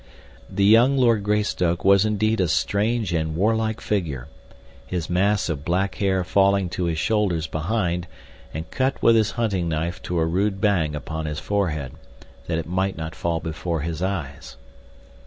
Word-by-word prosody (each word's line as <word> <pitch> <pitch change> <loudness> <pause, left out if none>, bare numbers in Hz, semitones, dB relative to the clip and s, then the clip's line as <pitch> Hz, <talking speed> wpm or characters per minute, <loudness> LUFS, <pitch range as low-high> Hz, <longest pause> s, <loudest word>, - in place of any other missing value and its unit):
The 100 - +1
young 120 +6 +5
Lord 115 -4 +3
Greystoke 100 -5 0
was 100 +1 +6
indeed 110 0 +1
a 90 - +2
strange 105 +4 0
and 80 -1 -1
war 105 +6 +2
like 110 -1 -1
figure, 75 -11 -2 0.6
his 90 -2 -3
mass 100 +3 +2
of 75 -5 -3
black 95 +4 0
hair 95 -2 0
falling 100 +1 +2
to 90 0 -2
his 85 -2 -1
shoulders 95 -4 +1
behind 85 +3 -1 0.4
and 80 +1 -6
cut 135 +1 0
with 115 - +6
his 110 -1 +3
hunting 100 -7 0
knife 80 +2 -2
to 90 - -3
a 80 - +2
rude 95 +4 0
bang 85 -8 +1
upon 80 +1 -4
his 75 -1 -4
forehead, 80 -7 -1 0.6
that 80 - -1
it 80 - -3
might 95 +2 -1
not 80 0 -5
fall 85 -1 -1
before 80 0 -3
his 80 +1 -4
eyes. 80 -9 -4
90 Hz, 170 wpm, -23 LUFS, 80-105 Hz, 0.6 s, was